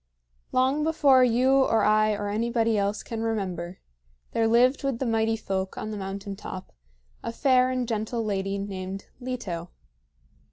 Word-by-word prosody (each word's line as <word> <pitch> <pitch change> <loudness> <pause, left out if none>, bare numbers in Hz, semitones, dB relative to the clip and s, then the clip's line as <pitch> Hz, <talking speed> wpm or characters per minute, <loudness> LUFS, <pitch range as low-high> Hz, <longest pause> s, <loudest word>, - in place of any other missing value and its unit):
Long 265 +4 +2
before 290 -5 +5
you 250 +2 +3
or 225 -5 +3
I 215 0 +4
or 205 0 -3
anybody 230 +1 +1
else 200 +1 0
can 225 -2 -5
remember, 185 -6 -3 0.5
there 225 -1 +2
lived 245 +5 +4
with 275 -3 0
the 265 - -2
Mighty 225 -1 +1
Folk 190 -3 -3
on 215 - -4
the - - -4
mountain 195 +1 -5
top 190 -1 -8 0.5
a - - -4
fair 255 0 +3
and 255 -1 -1
gentle 225 +1 -2
lady 195 -1 -1
named 195 -1 -6
Leto. 210 -10 -5
225 Hz, 155 wpm, -26 LUFS, 200-250 Hz, 0.5 s, before